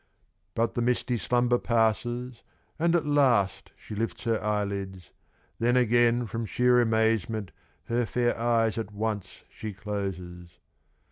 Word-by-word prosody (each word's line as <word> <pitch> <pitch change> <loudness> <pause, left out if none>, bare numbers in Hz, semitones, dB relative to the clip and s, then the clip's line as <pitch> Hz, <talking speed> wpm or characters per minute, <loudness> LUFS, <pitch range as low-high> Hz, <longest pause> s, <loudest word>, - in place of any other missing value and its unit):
But 115 0 +1
the 120 - -1
misty 125 +1 0
slumber 120 +1 +2
passes, 120 +2 0 0.4
And 170 +1 +3
at 165 - +1
last 130 -10 +2
she - - -10
lifts 115 +2 -3
her 115 -1 0
eyelids. 100 -4 -3 0.5
Then 120 +2 +3
again 120 0 +3
from 115 +1 -4
sheer 125 +2 +3
amazement 110 -3 +1 0.3
Her 120 0 -1
fair 120 0 +1
eyes 115 -1 +1
at 110 -2 -5
once 105 -2 -4
she 110 -2 -6
closes. 90 -4 -6
115 Hz, 130 wpm, -27 LUFS, 105-120 Hz, 0.5 s, And